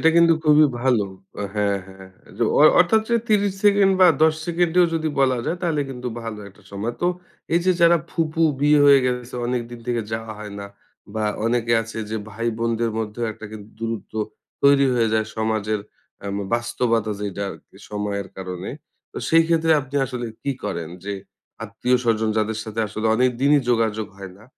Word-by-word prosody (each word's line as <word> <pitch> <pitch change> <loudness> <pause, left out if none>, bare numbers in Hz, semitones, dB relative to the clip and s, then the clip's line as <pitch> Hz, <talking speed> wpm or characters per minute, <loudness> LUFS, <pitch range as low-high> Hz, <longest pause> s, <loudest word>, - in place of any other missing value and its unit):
এটা 160 - +5
কিন্তু 170 0 +6
খুবই 150 0 +6 0.2
ভালো। 120 -5 +2 0.4
আ - - -2
হ্যাঁ, 100 -1 +1
হ্যাঁ, 95 0 -13 0.3
যে - - 0 0.2
অ - - +5 0.2
অর্থাৎ 215 +5 +4
যে 235 - +4
৩০ 205 -2 +2
সেকেন্ড 200 -1 +5
বা 185 - +9 0.2
১০ 160 0 +5
সেকেন্ডেও 175 +1 +3
যদি 160 -1 0
বলা 130 -2 +3
যায় 175 - -1
তাহলে 160 -4 0
কিন্তু 125 -1 -5
ভালো 115 -2 -6
একটা 100 +1 -21
সময়। 105 +4 -3
তো 175 - +3 0.5
এই 170 - +4
যে 185 - +5
যারা 170 0 +6
ফুফু 165 0 -1 0.2
বিয়ে 150 +1 +5
হয়ে 140 -1 +8
গেছে 125 0 -3
অনেকদিন 120 -1 -3
থেকে 120 -2 0
যাওয়া 110 0 -4
হয় 105 -1 -8
না, 100 - -6 0.5
বা 110 -1 -1 0.2
অনেকে 115 0 +1
আছে 115 0 -8
যে 110 - -2
ভাই 115 +3 -4
বোনদের 115 0 0
মধ্যেও 110 +2 -3
একটা 110 0 -10
কিন্তু 105 0 -10
দূরত্ব 115 -1 -5 0.5
তৈরি 140 0 +6
হয়ে 115 -2 +2
যায় 110 -1 +1
সমাজের 110 -1 -1 0.4
অ্যাম 100 0 -4 0.2
বাস্তবতা 120 -2 0
যেইটা 100 -1 -4
আরকি 95 - -14
সময়ের 105 -1 -3
কারণে। 90 -1 -6 0.4
তো - - -5
সেই 165 0 +6
ক্ষেত্রে 165 -1 +3
আপনি 135 +1 -6
আসলে 125 -2 -5 0.2
কি 140 - -1
করেন? 85 -5 -3 0.2
যে 100 - -3 0.5
আত্মীয়স্বজন 115 0 0
যাদের 110 0 -1
সাথে 110 0 -4
আসলে 110 +2 -3
অনেক 125 +2 +3
দিনই 145 +1 +5
যোগাযোগ 110 -2 +1
হয় 95 -2 -8
না? 105 - -17
115 Hz, 180 wpm, -22 LUFS, 110-145 Hz, 0.5 s, বা